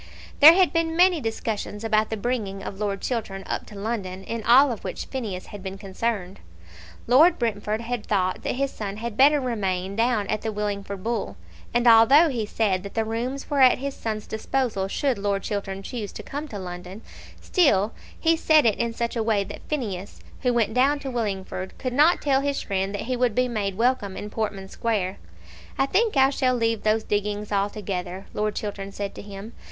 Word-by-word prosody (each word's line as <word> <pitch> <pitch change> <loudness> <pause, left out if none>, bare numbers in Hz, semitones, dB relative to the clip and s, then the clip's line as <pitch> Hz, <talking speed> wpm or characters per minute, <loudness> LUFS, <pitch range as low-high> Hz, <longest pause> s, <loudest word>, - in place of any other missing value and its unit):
There 305 +3 +11
had 370 0 +3
been 330 -1 0
many 355 -3 +5
discussions 220 -2 -3
about 215 -1 +2
the 220 - -3
bringing 205 -4 -3
of 195 - -7
Lord 200 -2 -2
Chiltern 210 -6 -3
up - - -4
to 210 - -12
London, 200 -3 -4
in 230 +3 -4
all 260 +5 +6
of 225 - -6
which - - -5
Phineas 215 -9 -5
had 205 - -7
been 190 0 -6
concerned. 195 -1 -3 0.7
Lord 295 +9 +6
Brentford 215 -2 -1
had 235 -1 -4
thought 185 -3 0
that - - -2
his 275 +1 -1
son 205 -1 -5
had 230 0 -5
better 290 +4 +5
remain 195 -7 -2
down 225 -2 +1
at 215 +1 -2
the 220 - -2
Willingford 200 -2 -4
Bull; 220 - -2 0.3
and 240 +1 +1
although 240 +8 +7
he 230 -6 -2
said 200 -4 0
that 200 +1 -9
the 225 -1 +1
rooms 245 +5 -3
were 285 -2 +2
at 255 -1 +7
his 275 +1 -4
son's 215 -2 -4
disposal 220 -3 -1
should 260 +3 -1
Lord 200 -1 -1
Chiltern 195 -1 -4
choose 220 -2 -5
to - - -8
come 290 +2 -5
to 215 - -7
London, 180 +2 -8 0.4
still 225 - +2 0.3
he 330 0 +3
said 315 -3 +4
it 220 -3 +2
in 235 -1 0
such 235 +1 -2
a 230 - 0
way 215 -2 +1
that 205 +1 -9
Phineas, 205 -10 -4 0.2
who 250 - +2
went 230 -3 +1
down 275 +4 +3
to 270 - -4
Willingford, 195 -5 -4
could 255 -1 -3
not 305 +6 +4
tell 275 -2 +3
his 280 0 -1
friend 195 -1 -1
that - - -3
he 255 +1 -2
would 245 -3 +1
be 250 0 +2
made 200 -5 -2
welcome 230 -5 +1
in 210 - -6
Portman 205 -3 -3
Square. 195 -3 -2 0.6
"I 270 - +3
think 410 +4 +1
I 265 0 +5
shall 255 -2 +1
leave 230 -2 0
those 215 +1 +1
diggings 210 0 -2
altogether," 195 -2 -2
Lord 210 0 -1
Chiltern 200 -2 -5
said 200 0 -5
to - - -9
him. 205 +2 -9
220 Hz, 200 wpm, -24 LUFS, 200-250 Hz, 0.7 s, There